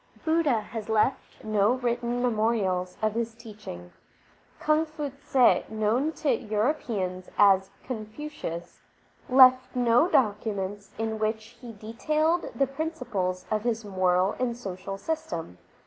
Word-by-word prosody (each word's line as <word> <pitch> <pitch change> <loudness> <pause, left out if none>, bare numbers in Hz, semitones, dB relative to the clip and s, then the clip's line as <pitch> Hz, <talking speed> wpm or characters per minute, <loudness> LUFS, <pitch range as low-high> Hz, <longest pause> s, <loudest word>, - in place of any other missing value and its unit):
Budha 315 -8 +2
has 220 0 -7
left 220 +5 0
no 215 +1 +2
written 245 -1 -1
memorials 215 -6 0
of 215 -1 +2
his 230 0 -2
teaching, 210 - -10 0.7
Rung 310 +1 +3
fu 300 -2 -5
tze, 270 -2 +2
known 220 +7 +1
to 300 - +1
Europeans 210 -5 -2
as 195 -2 +5
Confucius, 220 - -6 0.5
left 255 0 +6
no 245 +5 +4
documents 205 - 0
in 220 0 -2
which 220 +2 -2
he 240 -2 -8
detailed 305 +11 0
the 275 - +3
principles 250 - -3
of 215 -1 +1
his 230 -1 -2
moral 185 -1 +2
and 240 -2 -1
social 195 -3 -6
system. 175 - -4
225 Hz, 120 wpm, -27 LUFS, 205-255 Hz, 0.7 s, left